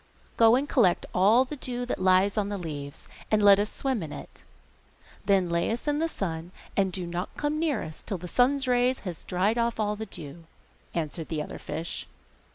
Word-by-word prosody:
'Go 225 0 +6
and 275 +3 0
collect 200 -12 +3
all 215 +8 +5
the 300 - -6
dew 245 -2 -4
that 250 - -3
lies 185 +2 +4
on 205 -2 0
the 205 - -2
leaves, 145 -5 -7 0.2
and 215 -1 +3
let 200 -1 +8
us 205 +1 0
swim 265 -6 -1
in 155 -3 -6
it. - - -10 0.9
Then 195 -3 +4
lay 170 0 0
us 230 +5 -3
in 295 0 +1
the 330 +1 +1
sun, 170 - -4 0.2
and 195 -2 +2
do 180 -1 -4
not 175 +1 -3
come 300 +1 -1
near 310 -8 0
us 155 -1 -9
till 195 - -3
the 180 +1 -8
sun's 265 +6 +2
rays 250 +1 +3
shall 180 -3 -5
have 160 - -13
dried 200 +6 +1
off 235 0 +1
the 215 0 -2
dew,' 165 -1 -9 0.5
answered 160 0 -3
the 155 -2 -2
other - - -8
fish. 160 +3 -5
200 Hz, 205 wpm, -27 LUFS, 175-245 Hz, 0.9 s, let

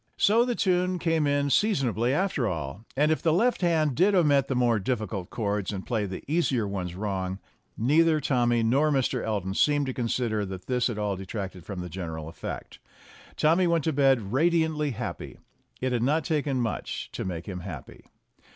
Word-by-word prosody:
So 225 +4 +4
the 245 -1 -1
tune 180 -2 +1
came 165 -3 +1
in 145 0 +1
seasonably 125 - +2
after 150 - 0
all, 80 +3 -4
and 150 +2 +3
if 155 - 0
the 165 - +2
left 230 +9 +2
hand 160 -5 +2
did 190 +9 +3
omit 145 -6 +4
the 135 - -1
more 120 -3 +2
difficult 105 -3 -3
chords 105 -3 -2
and 95 -2 -5
play 110 -4 -1
the 95 - -7
easier 140 -8 +1
ones 90 -3 -4
wrong, 95 -2 -3 0.4
neither 155 +6 +3
Tommy 120 -4 +2
nor 135 +7 +3
Mr. 135 -3 0
Elton 100 -4 -2
seemed 145 +6 +2
to 130 - -3
consider 115 -3 -1
that 95 -2 -7
this 125 0 +1
at 115 - -4
all 105 -2 -1
detracted 95 -2 -6
from 95 -3 -5
the 90 - -5
general 80 -3 -5
effect. 80 - -7 0.6
Tommy 170 +4 +3
went 170 -2 +2
to 160 - 0
bed 135 -7 +2
radiantly 160 0 +2
happy. 130 - -6 0.4
It 130 0 0
had 120 -2 0
not 150 +6 +2
taken 145 -5 0
much 115 -3 -3
to - - -4
make 85 -3 -4
him 95 -3 -5
happy. 90 -7 -9
125 Hz, 185 wpm, -27 LUFS, 100-155 Hz, 0.6 s, So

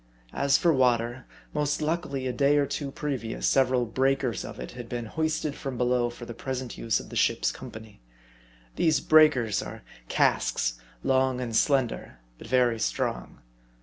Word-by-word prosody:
As 140 +1 +3
for 170 -2 +3
water, 120 -1 +1 0.3
most 150 -1 0
luckily 155 -4 -2
a 125 - -1
day 140 +3 +3
or 145 - +3
two 140 0 -4
previous 135 -6 -4
several 130 -2 +3
"breakers" 130 -1 0
of - - -8
it 65 - -6
had 120 -2 -9
been 120 -1 -4
hoisted 155 +3 -1
from 135 -3 -6
below 125 0 +1
for 120 0 -9
the 120 - -7
present 130 0 -5
use 115 - 0
of - - -10
the - - -9
ship's - - +2
company. 110 - -11 0.8
These 160 -2 +3
"breakers" 150 -10 +4
are - - -8 0.3
casks, - - +1 0.2
long 130 -1 +2
and 120 -3 -3
slender, 125 - +1 0.2
but - - -10
very 120 -2 +2
strong. - - -2
130 Hz, 160 wpm, -27 LUFS, 120-140 Hz, 0.8 s, breakers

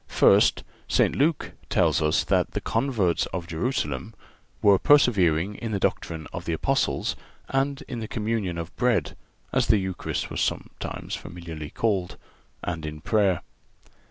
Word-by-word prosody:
First—St. - - +3
Luke 150 +2 +1 0.2
tells 80 - +3
us 75 0 +2
that - - +1
the - - -1
converts 105 -11 0
of 90 -2 -5
Jerusalem 85 - -2 0.4
"were 100 -2 +5
persevering 100 - +4
in 110 +1 -5
the 100 - 0
doctrine 85 -6 -1
of 85 - -5
the 85 - -1
Apostles, 80 - 0 0.3
and 135 +1 0
in 120 - -6
the 110 - -4
communion 105 -6 -2
of 85 0 -6
bread 110 -11 +1 0.4
(as - - +2
the 110 - +5
Eucharist 95 -2 -3
was - - -2
sometimes - - -3
familiarly 85 -4 -7
called), 100 -4 -1 0.5
and 85 -2 -3
in 75 0 -5
prayer." 100 -4 +2
95 Hz, 140 wpm, -26 LUFS, 85-115 Hz, 0.5 s, were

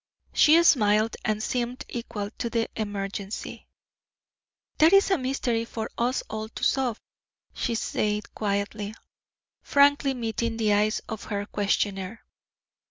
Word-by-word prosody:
She 325 +3 +6
smiled 215 -7 +4
and 215 0 -1
seemed 245 +1 -2
equal 230 -4 -5
to 235 - -1
the 230 -1 0
emergency. 205 -1 -5 1.1
"That 320 +4 +6
is 395 0 +5
a 380 - +4
mystery 255 -3 -1
for 225 -1 -5
us 245 +2 0
all 220 0 -5
to - - -9
solve," 255 -5 +1 0.5
she 235 - -2
said 210 -1 -1
quietly, 205 +1 -2 0.7
frankly 280 -1 +4
meeting 230 -1 -2
the 215 -2 +2
eyes 210 +1 +2
of 220 -2 -6
her 205 -1 -3
questioner. 200 0 -1
225 Hz, 125 wpm, -26 LUFS, 210-245 Hz, 1.1 s, She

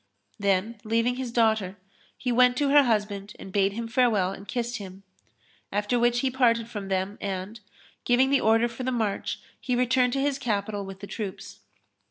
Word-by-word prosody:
Then 200 +2 0
leaving 230 +3 +1
his 255 -2 -4
daughter, 220 -5 +1 0.4
he 250 - -2
went 250 +1 +4
to 285 0 +2
her 290 +1 +7
husband 205 -3 -1
and 190 - -10
bade 195 -1 +2
him 230 +2 -4
farewell 225 -6 +2
and 195 +1 -10
kissed 240 +3 -2
him; 195 -1 -10 0.7
after 210 +4 0
which 240 0 +2
he 265 - 0
parted 235 -3 +2
from 205 -4 -6
them 190 +1 -2
and, 195 +2 -4 0.4
giving 255 +2 +3
the 280 - +4
order 225 +2 +4
for 235 +1 -8
the 255 +1 -1
march 220 -5 -2 0.2
he 250 - -1
returned 250 0 +2
to 270 - 0
his 275 0 0
capital 205 -4 -2
with 195 0 -9
his 200 0 -9
troops. 205 -4 -6
230 Hz, 185 wpm, -26 LUFS, 200-245 Hz, 0.7 s, her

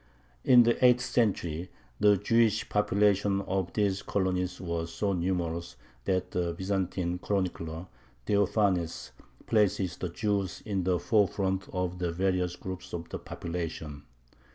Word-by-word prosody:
In 125 -1 +7
the 120 +2 +1
eighth 125 0 +6
century 90 -9 0 0.3
the 105 -1 +5
Jewish 110 +1 +2
population 100 -1 +2
of 95 -2 -2
these 100 -2 +1
colonies 90 -2 -1
was 85 -2 -3
so 100 +3 -1
numerous 85 -5 -2 0.3
that 95 -1 0
the 85 -1 -1
Byzantine 95 -2 -1
chronicler 90 -4 -2 0.4
Theophanes 100 -4 +1 0.3
places 95 -4 +1
the 90 - -3
Jews 100 0 -2
in 100 -4 -1
the 90 -1 +2
forefront 95 -2 +1
of 90 -1 -2
the 90 -1 -1
various 90 0 0
groups 95 0 -7
of 85 -1 -5
the - - -5
population. 80 -4 -5
95 Hz, 130 wpm, -29 LUFS, 85-100 Hz, 0.4 s, In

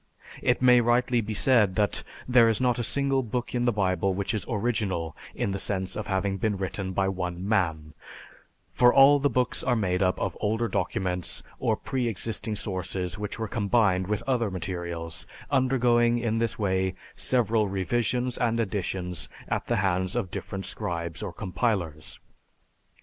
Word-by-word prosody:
"It 125 +1 +1
may 125 -1 +7
rightly 120 +1 +2
be 110 0 -4
said 105 -6 +3
that 105 -1 +1 0.3
there 120 -2 +6
is 110 - +1
not 125 -2 +2
a - - 0
single 135 +3 +1
book 120 0 -3
in 120 -1 0
the 120 - +4
Bible 95 -2 +1
which 100 +3 -2
is 110 - -2
original 100 - -1 0.2
in 100 - -1
the 100 - -2
sense 95 -2 -1
of 105 - -4
having 95 0 0
been 105 0 0
written 95 0 -3
by 95 +1 +1
one 90 -1 -3
man, 80 -7 0 0.8
for 125 0 +5
all 140 +2 +7
the 145 +1 +2
books 125 -2 0
are 125 - +2
made 90 -4 0
up 90 -1 +2
of - - -2
older 110 +2 +1
documents 90 -5 -2 0.2
or - - +1
pre 130 -2 -2
existing 110 0 -2
sources 95 -2 -4
which 105 0 -4
were 110 -1 -3
combined 100 -4 +2
with 105 +4 -2
later 120 -5 +1
materials, 85 -2 -5 0.2
undergoing, 120 -3 +3
in 115 -1 0
this 115 0 -1
way, 95 -3 0 0.2
several 115 -4 +2
revisions 120 +6 -1
and 115 -2 +1
editions 95 -4 -2 0.2
at - - -2
the - - +1
hands 95 +1 0
of 105 -7 -2
different 95 0 -5
scribes 85 -2 -4
or 100 - -4
compilers. 90 -5 -2
105 Hz, 165 wpm, -27 LUFS, 95-120 Hz, 0.8 s, may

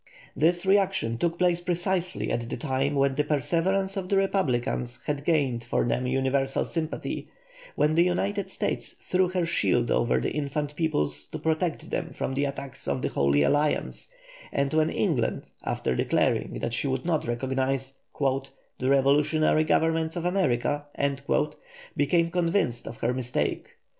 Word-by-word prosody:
This 175 +5 +2
reaction 190 - +2
took 170 0 0
place 175 -1 +2
precisely 180 +1 -1
at 115 0 -2
the - - -3
time 140 0 -1
when 140 -1 +3
the 150 +2 +1
perseverance 170 +7 0
of 185 -2 -4
the 200 - +3
republicans 130 -10 0
had 145 -1 -2
gained 140 -8 +1
for 115 - 0
them 125 +1 0
universal 135 +1 +1
sympathy, 160 -2 -3 0.5
when 150 +1 +2
the 165 - +4
United 195 +3 0
States - - -2
threw 185 0 +1
her 180 -2 0
shield 120 -8 +1
over 120 - +2
the - - -1
infant 145 0 -2
peoples 75 - -1
to - - -6
protect 160 +1 -1
them - - -2
from - - -3
the 140 +2 +1
attacks 140 -1 -6
of 70 -2 -1
the - - +1
Holy 70 +1 +2
Alliance, 150 - 0 0.4
and 140 +1 0
when 155 0 +3
England, 155 - -1
after - - -1
declaring - - +1
that 115 - -2
she 130 - 0
would 130 +1 -2
not 160 -7 0
recognise 130 +2 -1 0.2
"the 135 -1 -2
revolutionary 150 +3 +3
governments 160 +1 +1
of 175 -1 -3
America," 145 -6 +1 1.1
became 170 +3 +2
convinced 170 -8 0
of 115 - -7
her 120 +2 +1
mistake. 125 -1 -2
145 Hz, 155 wpm, -27 LUFS, 130-170 Hz, 1.1 s, the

